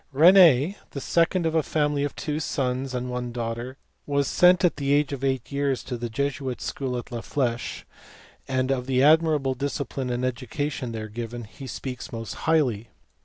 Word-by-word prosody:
Rene, 165 +1 +6
the 140 - -6
second 170 +4 +1
of 160 - +1
a 160 - +3
family 145 -1 0
of 145 - -3
two 150 0 -3
sons 130 -3 -2
and 125 0 -2
one 125 -1 -4
daughter, 120 +2 -4 0.3
was 140 -1 +1
sent 180 +1 +5
at 170 - +1
the 140 0 +1
age 145 0 +2
of 135 -1 -5
eight 130 -2 -1
years 140 -2 0
to 130 - -4
the 120 0 -4
Jesuit 135 +1 -2
School 130 -3 -3
at 120 - -7
la 120 -1 -4
Fleche, 120 -3 -2 0.6
and 130 0 0
of 125 -1 -1
the 130 0 +2
admirable 155 -3 +4
discipline 135 -1 -3
and 125 +1 -1
education 130 +1 -3
there 110 -1 -5
given 115 +2 -6
he 120 +5 -10
speaks 125 +1 -6
most 115 -1 -5 0.2
highly. 125 -9 +2
135 Hz, 180 wpm, -25 LUFS, 125-145 Hz, 0.6 s, Rene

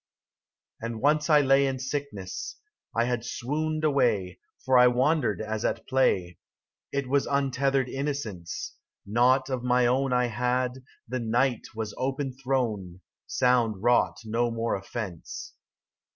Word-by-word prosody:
And 115 0 -4
once 150 +4 +2
I 150 -1 +6
lay 135 0 +4
In 135 -1 -1
sickness; 130 -8 -5 0.4
I 115 - +4
had 120 -1 -1
swooned 155 +6 -2
away, 115 - +1 0.3
For 130 -1 +5
I 125 - +8
wandered 125 - +2
as 110 0 -3
at - - -1
play; 95 - +1 0.5
It 140 -1 -2
was 140 +2 +1
untethered 135 -1 +1
innocence: 135 - -4 0.3
Naught 130 +5 +3
of 130 -2 -1
my 125 0 +3
own 130 +2 +2
I 125 0 +3
had, 125 +2 -1 0.2
the 130 +2 -2
night 120 +2 0
was 110 -2 -4
open 135 +1 -2
thrown, 115 -9 -2 0.3
Sound 120 -5 +2
wrought 120 0 +3
no 115 +2 0
more 115 0 -1
offence. 100 -3 -6
125 Hz, 135 wpm, -27 LUFS, 115-135 Hz, 0.5 s, I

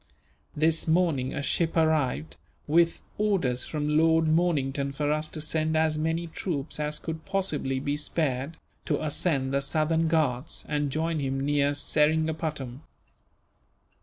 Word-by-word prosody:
This 160 +2 +1
morning 160 -6 +2
a 140 - -3
ship 165 +4 0
arrived, 130 - +1 0.3
with 170 +2 +2 0.2
orders 175 -13 +1
from 150 0 0
Lord 160 0 +4
Mornington 145 -4 +1
for 145 +1 -1
us 155 0 0
to 155 - -7
send 155 +1 +1
as 160 -1 +2
many 160 +2 -1
troops 160 -4 -4
as 150 0 -1
could 160 -1 -6
possibly 155 -9 -1
be 145 +2 -1
spared, 150 -1 -1 0.3
to 150 - 0
ascend 145 -3 0
the 140 - +2
southern 160 +3 +1
Ghauts 150 -4 0
and 145 -1 0
join 160 +2 -1
him 135 -1 -1
near 145 0 +2
Seringapatam. 150 -3 0
155 Hz, 135 wpm, -27 LUFS, 140-160 Hz, 0.3 s, Lord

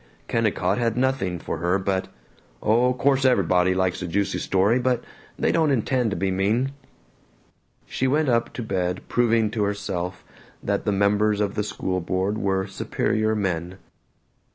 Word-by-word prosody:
Kennicott 105 -3 0
had 115 -1 0
nothing 125 -9 0
for - - -5
her 90 +3 +1
but 95 -1 -1 0.5
"Oh, 120 - +3
course, 135 +1 +2
ev'body 95 -7 +3
likes 95 0 0
a 90 - -3
juicy 100 +3 -1
story, 100 +6 +2
but 125 -1 0 0.3
they - - +1
don't 160 -2 +2
intend 125 -2 +1
to 100 - -2
be 95 +2 -1
mean." 105 +8 +1 1.1
She 130 - -1
went 150 +3 +2
up 115 -2 +1
to 120 - -5
bed 90 -3 -2
proving 115 -3 +2
to 110 - -2
herself 100 -3 -3 0.4
that - - -1
the - - +2
members 100 +1 +2
of 100 -1 0
the 105 - -1
school 95 -3 -2
board 95 +4 -1
were 95 -1 0
superior 110 +2 -1
men. 90 -3 -2
100 Hz, 155 wpm, -24 LUFS, 95-120 Hz, 1.1 s, Oh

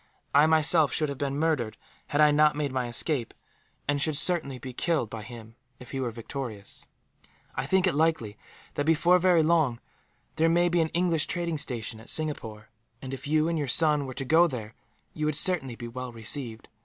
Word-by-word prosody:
I, 145 +2 +5
myself, 160 -1 +4
should 155 -2 -1
have 140 - -6
been 140 -1 -2
murdered, 150 -8 -1 0.3
had 145 - 0
I 150 0 +6
not 150 0 +3
made 145 -2 -2
my 130 -2 -2
escape; 120 0 -2 0.5
and 145 0 0
should 155 -1 +2
certainly 155 -5 +3
be 125 +1 -9
killed 150 -5 -1
by 115 - -6
him, 115 0 -11 0.3
if 125 - -12
he 135 - -4
were 130 -2 -2
victorious. 115 -2 -8 0.7
"I - - -4
think 190 0 +2
it 185 - +1
likely 150 -9 0 0.4
that, 145 - -3
before 170 +3 +4
very 175 -2 +3
long, 155 -7 +1 0.6
there 165 +1 +3
may 175 +1 +3
be 175 0 +2
an 160 - 0
English 170 -2 0
trading 170 -3 -2
station 120 -6 -5
at 115 - -14
Singapore 115 -9 -4 0.3
and, 130 +1 -8
if 135 +2 -7
you 155 +1 +2
and 165 -1 -1
your 145 - -2
son 150 +1 +4
were 130 - -8
to 135 - -4
go 165 +5 +4
there, 115 -7 -7 0.4
you 155 -1 -2
would 155 - -1
certainly 145 -8 +2
be 120 0 -8
well 125 +1 -7
received. 115 0 -4
145 Hz, 200 wpm, -27 LUFS, 120-160 Hz, 0.7 s, I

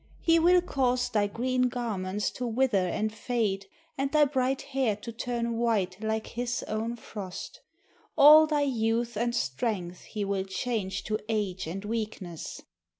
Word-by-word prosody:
He 330 0 +4
will 355 +2 +5
cause 255 -6 +1
thy 205 -2 +2
green 250 +4 0
garments 210 -5 -2
to 250 - -4
wither 230 -6 +2
and 215 +4 -1
fade 215 -4 -1 0.3
and 275 0 0
thy 300 -1 +5
bright 265 -1 0
hair 260 -6 +2
to 215 +3 -8
turn 235 0 -2
white 205 -5 0
like 220 0 -1
his 245 +1 -3
own 225 +2 -2
frost. 215 - -8 0.6
All 305 +2 +9
thy 300 -2 +1
youth 235 -2 0
and 235 +2 0
strength 180 - -2
he 210 -2 -3
will 195 -1 -1
change 195 -1 -2
to 215 0 -1
age 195 -5 -1
and 195 +5 -5
weakness." 210 -6 -5
225 Hz, 150 wpm, -28 LUFS, 200-250 Hz, 0.6 s, All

